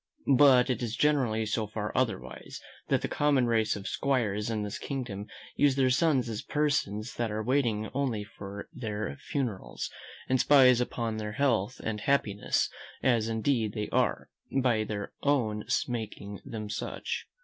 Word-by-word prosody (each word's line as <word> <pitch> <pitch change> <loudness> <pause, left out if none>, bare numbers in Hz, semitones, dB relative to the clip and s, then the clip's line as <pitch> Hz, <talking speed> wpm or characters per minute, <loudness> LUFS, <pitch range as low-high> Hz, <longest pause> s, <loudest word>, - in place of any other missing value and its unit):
But 130 -2 +6
it 125 - -2
is 115 -2 -2
generally 125 -7 +2
so 110 0 -1
far 105 0 -4
otherwise, 110 - -2 0.3
that - - +1
the - - +1
common 145 -4 +2
race 110 -2 +2
of 100 -2 -6
'squires 110 -3 0
in 110 -2 -1
this 105 0 -4
kingdom 120 -7 -4 0.3
use 145 -2 +4
their 130 -2 +3
sons 135 -3 +3
as 110 -2 -3
persons 125 -8 -1
that 120 -1 0
are 105 +1 -2
waiting 115 -4 +1
only 130 -6 -1
for 100 -1 -8
their 110 0 -4
funerals, 125 -11 -3 0.4
and 130 0 +2
spies 130 -4 +6
upon 115 -2 -2
their 105 -1 -4
health 125 -3 +1
and 105 -1 -3
happiness; 105 -7 +1 0.4
as 115 -4 +3
indeed 110 -1 0
they 105 -2 -3
are, - - 0 0.3
by 120 -4 +2
their 105 -1 -4
own 115 -7 +1 0.2
making 105 -4 -5
them 110 -2 -6
such. 105 - -4
115 Hz, 155 wpm, -29 LUFS, 105-130 Hz, 0.4 s, But